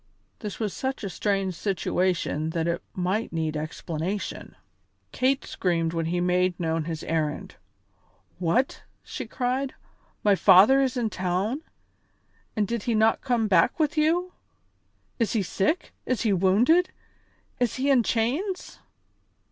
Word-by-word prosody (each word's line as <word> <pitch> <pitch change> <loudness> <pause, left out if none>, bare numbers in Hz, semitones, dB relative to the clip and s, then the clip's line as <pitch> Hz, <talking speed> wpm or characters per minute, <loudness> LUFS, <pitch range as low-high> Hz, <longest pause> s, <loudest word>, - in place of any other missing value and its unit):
This 210 -3 -6
was 215 -4 -2
such 265 -3 -3
a 195 - -3
strange 195 +1 0
situation 175 -3 -1
that 165 0 0
it 170 0 -1
might 190 +5 -1
need 160 -1 -2
explanation. 160 +5 -4 0.6
Kate 265 +1 +1
screamed 165 -3 -1
when 165 -1 -1
he 175 +1 0
made 180 0 +1
known 165 -2 -1
his 160 -1 -4
errand. 155 -2 -2 0.9
"What!" 205 +10 +1 0.2
she - - -6
cried, 260 +1 -2 0.5
"my 205 - +5
father 200 +8 +6
in 265 - +3
the 245 -3 -1
town, 190 - -1 0.9
and 210 -3 +1
did 235 0 -2
he 230 - +2
not 220 +1 +3
come 240 -4 +1
back 190 - +3
with 305 0 +1
you? 340 +4 +1 0.9
Is 230 - +1
he 220 -4 +1
sick? 200 - -1
Is 255 -4 0
he 215 -3 +2
wounded? 220 - +4 0.7
Is 245 -2 +1
he 275 +2 +1
in 260 -3 +5
chains?" 275 - -1
205 Hz, 140 wpm, -26 LUFS, 175-255 Hz, 0.9 s, father